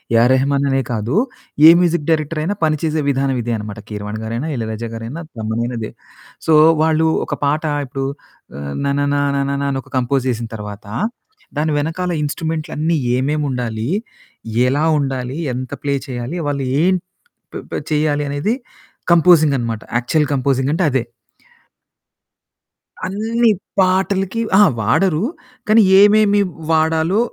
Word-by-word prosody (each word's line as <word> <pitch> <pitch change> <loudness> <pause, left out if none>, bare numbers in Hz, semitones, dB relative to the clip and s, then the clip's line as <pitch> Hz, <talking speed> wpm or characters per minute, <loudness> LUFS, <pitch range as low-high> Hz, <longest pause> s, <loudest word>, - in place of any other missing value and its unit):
AR 120 +3 +5
Rahman 140 +1 +1
అనే 135 0 +2
కాదు, 115 +5 -2 0.5
ఏ - - +11
music 170 -3 +1
director 155 0 0
అయినా 200 +6 -1
పని 155 -1 +1
చేసే 155 -1 0
విధానం 135 -1 0
ఇదే 120 0 -2
అనమాట. 105 0 -7
కీరవాణి 105 +1 -5
గారైనా, 115 +8 -3
ఇళయరాజా 115 -1 -4
గారైనా 115 +9 -6
తమనైనా 115 +2 -2
ఇదే. 110 - -5 0.6
సో, 160 - +5 0.3
వాళ్ళు 160 0 +2 0.2
ఒక 145 - -2
పాట 150 +3 +1 0.2
ఇప్పుడు 135 +1 -4 0.5
ఆహ్, 70 0 -5
'నననా 145 0 +1 0.2
నననా' 140 0 -1
అని 135 - -2
ఒక - - -21
కంపోజ్ 130 +1 0
చేసిన 115 0 -4
తర్వాత 105 -1 -8 0.7
దాని 155 +1 +1
వెనకాల 165 +4 -2
ఇన్‌స్ట్రుమెంట్లన్నీ 160 +1 -2 0.2
ఏమేమి 145 +4 0
ఉండాలి? 120 -2 -3 0.8
ఎలా 145 +4 +1 0.2
ఉండాలి? 130 -1 -3 0.2
ఎంత 130 0 -5
ప్లే 140 -1 0 0.2
చేయాలి? 125 +6 -4
వాళ్ళు 140 -1 -2 0.2
ఏం 185 +2 +4 0.6
ప్ - - -4 0.3
చేయాలి 150 -1 +1
అనేది 145 +10 -1 0.6
కంపోజింగనమాట 150 -10 +4 0.2
యాక్చువల్ 150 +6 +1
కంపోజింగంటే 140 +4 +1
అదే. 130 -2 +1 2.0
అన్నీ 225 +4 +1 0.3
పాటలకి 190 +3 +1
అహా! 205 +1 +7
వాడరు. 170 - +2 0.4
కానీ 220 +1 +6 0.2
ఏమేమి 205 0 +5 0.3
వాడాలో 160 +4 +2
145 Hz, 125 wpm, -18 LUFS, 125-160 Hz, 2.0 s, ఏ